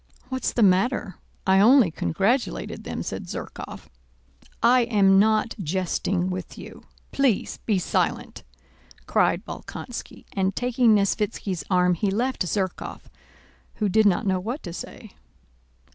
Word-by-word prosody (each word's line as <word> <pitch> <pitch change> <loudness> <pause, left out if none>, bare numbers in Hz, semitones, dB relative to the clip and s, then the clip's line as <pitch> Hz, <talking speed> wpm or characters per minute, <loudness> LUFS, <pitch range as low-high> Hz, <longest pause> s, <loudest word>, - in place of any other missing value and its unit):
"What's 260 0 -1
the 235 - +2
matter? 195 +2 +2 0.3
I 190 0 +4
only 230 -2 +6
congratulated 80 - -1
them," - - -4
said - - -5
Zherkóv. - - -7 0.8
"I 245 +1 +5
am 195 -4 +4
not 215 +2 +2
jesting 185 +1 -1
with 185 -1 -6
you; - - -11 0.3
please 270 -7 +1
be 210 -4 +3
silent!" 180 - -1 0.6
cried - - +1
Bolkónski, - - -8
and 190 0 0
taking 245 -2 +3
Nesvítski's 200 -4 -1
arm 180 -1 +3
he 195 +4 0
left 240 +6 -1
Zherkóv, 185 0 -3 0.7
who 210 - 0
did 215 +2 +4
not 185 -1 +1
know 190 -2 +1
what 235 +10 -5
to 175 - -6
say. - - -9
200 Hz, 130 wpm, -24 LUFS, 185-230 Hz, 0.8 s, only